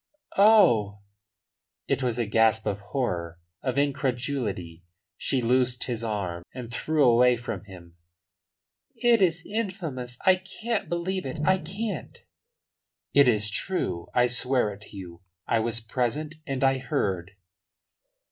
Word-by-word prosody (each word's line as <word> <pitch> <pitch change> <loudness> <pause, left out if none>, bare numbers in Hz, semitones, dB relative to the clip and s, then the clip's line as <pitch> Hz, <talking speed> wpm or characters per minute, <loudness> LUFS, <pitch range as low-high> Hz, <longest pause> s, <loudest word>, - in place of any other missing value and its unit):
"Oh!" 140 - +5 0.9
It - - 0
was 125 -2 -1
a 120 - 0
gasp 110 +1 +3
of 100 - -1
horror, 90 - -3 0.2
of 130 -1 -2
incredulity. 125 - -2 0.3
She 130 -3 -1
loosed 125 +1 +2
his 120 -2 -3
arm 100 -6 -3
and 120 -2 -7
drew 155 +4 +1
away 125 0 +5
from 120 -3 -6
him. 90 -3 -13 1.0
"It 235 -2 +3
is 175 -2 +2
infamous! 175 - -4
I 185 -1 +6
can't 215 +4 -3
believe 180 0 -2
it. 130 - -5
I 190 +2 +4
can't." 200 +7 -5 1.0
"It 140 -1 +6
is 110 -3 +3
true. 100 - -2
I 125 - +5
swear 120 -2 +1
it 100 - -14
to 100 - -11
you. 85 -2 -9 0.2
I 115 - +1
was 115 +1 -1
present, 125 +7 -2
and 135 -1 -2
I 135 0 +3
heard." 100 - -2
125 Hz, 135 wpm, -26 LUFS, 105-155 Hz, 1.0 s, I